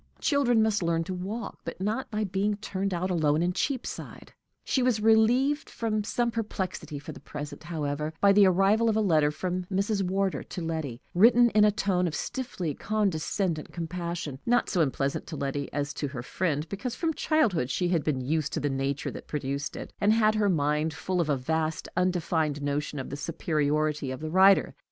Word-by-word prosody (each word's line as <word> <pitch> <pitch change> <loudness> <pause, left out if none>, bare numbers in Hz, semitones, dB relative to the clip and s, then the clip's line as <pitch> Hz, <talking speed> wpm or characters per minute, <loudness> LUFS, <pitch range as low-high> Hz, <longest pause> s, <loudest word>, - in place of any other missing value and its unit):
Children 245 -7 +3
must 215 -1 +1
learn 165 -1 +1
to 185 - -5
walk, 195 +6 -5
but 165 - -6
not 215 +7 -2
by 215 0 -1
being 200 +2 0
turned 195 -1 -3
out 185 +1 -1
alone 155 -2 +2
in 180 +1 +1
Cheapside. 260 +5 -4 0.3
She 265 - +1
was 245 -3 +2
relieved 240 +7 +3
from 215 -2 -1
some 235 +3 0
perplexity 205 -9 -4
for 145 - -8
the - - -10
present, 150 +1 -8
however, 150 -2 -2
by 200 - +6
the 200 -1 +7
arrival 195 +5 +3
of 220 - +1
a - - +2
letter 160 -8 +3
from 180 +3 -3
Mrs. 200 +2 0
Wardour 190 +1 0
to 180 - -7
Letty, 155 -7 -4
written 235 +5 +6
in 210 - +5
a - - +6
tone 195 -3 +1
of 160 - -3
stiffly 185 - -3
condescendent 190 -4 -1
compassion 170 -4 -4
not 245 +1 +2
so 180 - +2
unpleasant 135 -2 -1
to 160 - -6
Letty 140 0 -3
as 145 0 -2
to 145 - -3
her 125 -3 -6
friend, 155 +2 -1
because 235 +5 -4
from 325 -2 -1
childhood 220 - +1
she 180 +5 0
had 170 -4 +1
been 140 -4 0
used 150 +3 -1
to - - 0
the 145 -1 -1
nature 135 +1 -2
that - - -9
produced 140 0 -3
it, - - -8
and 205 - +4
had 215 -1 +4
her 210 -2 +2
mind 150 -1 +1
full 185 -1 -1
of 160 - -2
a 145 - +2
vast, 160 +4 -1
undefined 165 -5 0
notion 145 +1 -2
of 130 - -5
the - - -3
superiority 150 -2 0
of 130 - -5
the 155 0 -5
writer. 190 +2 +5
180 Hz, 195 wpm, -28 LUFS, 150-210 Hz, 0.3 s, the